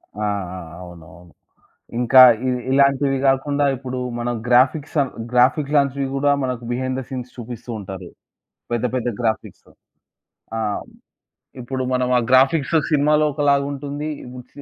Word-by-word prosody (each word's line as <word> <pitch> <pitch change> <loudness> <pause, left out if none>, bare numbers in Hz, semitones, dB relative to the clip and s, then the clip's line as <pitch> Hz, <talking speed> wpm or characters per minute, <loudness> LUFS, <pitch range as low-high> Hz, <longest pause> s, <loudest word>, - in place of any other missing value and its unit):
ఆ! 105 - -4 0.3
ఆ! - - -6 0.2
అవునవును. 85 0 -14 0.7
ఇంకా 125 +2 +6 0.3
ఇ - - +2 0.2
ఇలాంటివి 140 0 +3
గాకుండా 140 +2 +2
ఇప్పుడు 130 0 -6 0.2
మన 120 +1 -2 0.2
గ్రాఫిక్స్ 130 +6 +2
అను 135 - -2 0.2
గ్రాఫిక్స్ 135 +4 +2
లాంటివి 140 -1 +1
గూడా 145 +1 +2
మనకు 125 -2 -3
బిహైండ్ 130 +1 -2
థ 130 - -5
సీన్స్ 125 -2 -6
చూపిస్తూ 120 0 -8
ఉంటారు. 95 -2 -8 0.6
పెద్ద, 120 +1 0
పెద్ద 125 -1 -1
గ్రాఫిక్స్. 110 -2 -3 0.9
ఆ! - - -1 1.0
ఇప్పుడు 130 +2 -4
మనం 125 0 0
ఆ - - +4
గ్రాఫిక్స్ 140 +5 +3 0.2
సినిమాలో 150 +1 +3
ఒకలాగుంటుంది. 145 +1 -1
ఈ - - -11 0.3
సే 145 - -12
130 Hz, 130 wpm, -21 LUFS, 120-140 Hz, 1.0 s, ఇంకా